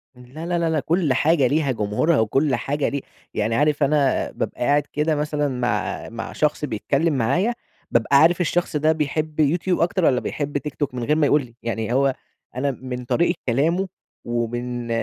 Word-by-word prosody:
لا 125 +6 -10
لا 175 0 0
لا 165 -1 +1
لأ، 160 -1 +1
كُلّ 160 -1 +1
حاجة 145 +1 +3
ليها 145 0 +1
جمهورها، 115 +8 +1
وكُلّ 135 +6 +2
حاجة 140 +5 -1
لي 140 -1 -3 0.3
يعني 110 +2 0
عارف 150 +2 +2
أنا 140 -1 +2
بابقى - - -5
قاعد 145 +4 +3
كده 150 +1 +1
مثلًا 150 0 -1
مع 120 -6 -2
مع 115 0 -6
شخص 150 0 0
بيتكلم 150 +3 0
معايا، 170 - +1 0.4
بابقى 120 +4 +3
عارف 170 +3 +4
الشخص 175 -1 0
ده 155 +1 +3
بيحب 155 0 -2
يوتيوب 170 +4 +2
أكتر، 175 +1 +1
والّا 125 -4 +4
بيحب 145 +2 -3
تيك 150 +1 -6
توك 145 -4 -2
من 125 -1 -4
غير 150 +5 +2
ما 155 -1 +3
يقول 145 +1 +4
لي، 120 -1 -19
يعني 115 0 -2
هو 135 0 +2 0.4
أنا 140 +2 0
من 125 -1 -6
طريقة 170 +7 +1
كلامه، 165 +10 +1 0.4
ومن 120 +1 -3
145 Hz, 185 wpm, -22 LUFS, 125-155 Hz, 0.4 s, عارف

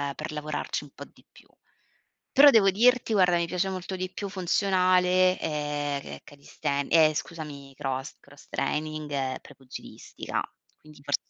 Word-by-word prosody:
per - - -6
lavorarci 150 0 -4
un - - -14
po' - - -9
di - - -24
più. - - -19 0.8
Però 285 +1 +8
devo 220 -7 +5
dirti 235 +4 +3
guarda, 180 -4 +4
mi 170 - 0
piace 180 +2 -1
molto 190 0 -5
di 185 0 -4
più 200 - -5
funzionale, 185 -1 +2
ehm, 145 -2 -2
che - - -8
è - - -14
calisthen 140 0 -4
ehm, 155 -2 +6
scusami 150 -4 -7
cross 135 0 -4
cross 145 0 -18
training 155 0 -3
e 135 -2 -2
Prepugilistica, 130 -1 -7 0.4
quindi 150 -2 -16
fors 145 0 +1
155 Hz, 155 wpm, -27 LUFS, 145-185 Hz, 0.8 s, Però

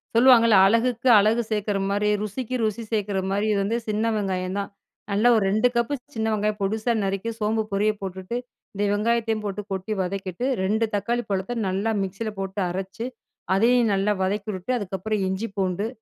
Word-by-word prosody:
சொல்லுவாங்கல்ல 230 -2 +6
"அழகுக்கு 235 +3 +2
அழகு 215 +3 +4
சேர்க்கற 210 -2 -1
மாரி, 205 +1 +1
ருசிக்கு 230 +4 -4
ருசி 220 +1 -1
சேர்க்கற 205 -3 0
மாரி," 205 +2 0
இது 200 - +1
வந்து 220 +4 0
சின்ன 215 +1 0
வெங்காயம் 190 -2 -2
தான். 200 - -4 0.4
நல்லா 210 +4 +4
ஒரு 215 - +3
2 215 +4 +3
கப் 235 +4 +1 0.2
சின்ன 220 0 -1
வெங்காயம் 210 0 0
பொடிசா 220 +4 0
நறுக்கி 195 +3 -2
சோம்பு 220 +1 +1
பொடிய 205 +2 +2
போட்டுட்டு, 190 +3 -5 0.4
இந்த 205 +1 -2
வெங்காயத்தையும் 225 0 0
போட்டு 205 0 -3
கொட்டி 195 +3 -2
வதக்கிட்டு, 190 +3 -3 0.2
2 215 +4 +1
தக்காளி 235 +4 -1
பழத்த 195 +5 -1
நல்லா 195 +4 0
மிக்ஸியில 200 +3 -4
போட்டு 195 +1 -4
அரைச்சு 190 +5 -5 0.5
அதையும் 235 +2 +4
நல்லா 195 +2 +1
வதக்கி 200 +3 -2
விட்டு, 185 +6 -4
அதுக்கப்புறம் 200 +1 -2
இஞ்சி 190 +4 -3
பூண்டு 190 +2 0
210 Hz, 165 wpm, -24 LUFS, 195-225 Hz, 0.5 s, சொல்லுவாங்கல்ல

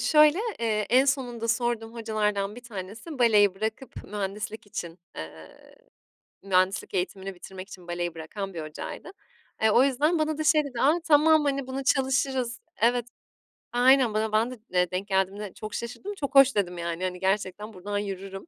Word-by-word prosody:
şöyle, 305 +2 +5 0.2
eee, 215 -2 0
en 255 +3 +6
sonunda 245 -4 -1
sorduğum 235 -1 -1
hocalardan 210 -2 -1
1 245 - -8
tanesi 225 - -8
baleyi 210 -5 +5
bırakıp 220 +6 -5
mühendislik 210 +2 -5
için 175 -3 -6 0.2
eee, 80 0 -11 0.7
mühendislik 185 -1 +1
eğitimini 190 +1 -3
bitirmek 185 +2 -10
için 180 -3 -12
baleyi 175 -1 -3
bırakan 195 +5 -6
bir 165 - -5
hocaydı. 155 - -7 0.5
Eee, 220 - +5
o 245 - +6
yüzden 295 +5 +2
bana 310 0 0
da 310 - -1
şey 310 -1 +4
dedi, 250 -5 -5
"A, 310 +6 +4
tamam, 310 +1 +6
hani, 275 -2 -1
bunu 265 +1 -4
çalışırız." 260 -2 +1 0.2
Evet, 240 +1 +3 0.7
aynen. 250 -1 +5
Bana 215 0 0
ben 220 +3 +2
de, 250 - -9
eee, 180 -1 +2
denk 185 +2 -3
geldiğimde 195 +1 -1
çok 215 -1 -8
şaşırdım. 245 - -5
"çok 280 -3 -4
hoş" 275 0 +7
dedim, 180 -4 0
yani, 170 +1 -3
hani, 180 -1 -2
gerçekten 200 +2 -1
buradan 205 +2 -4
yürürüm. 195 - -5
215 Hz, 165 wpm, -27 LUFS, 190-260 Hz, 0.7 s, hoş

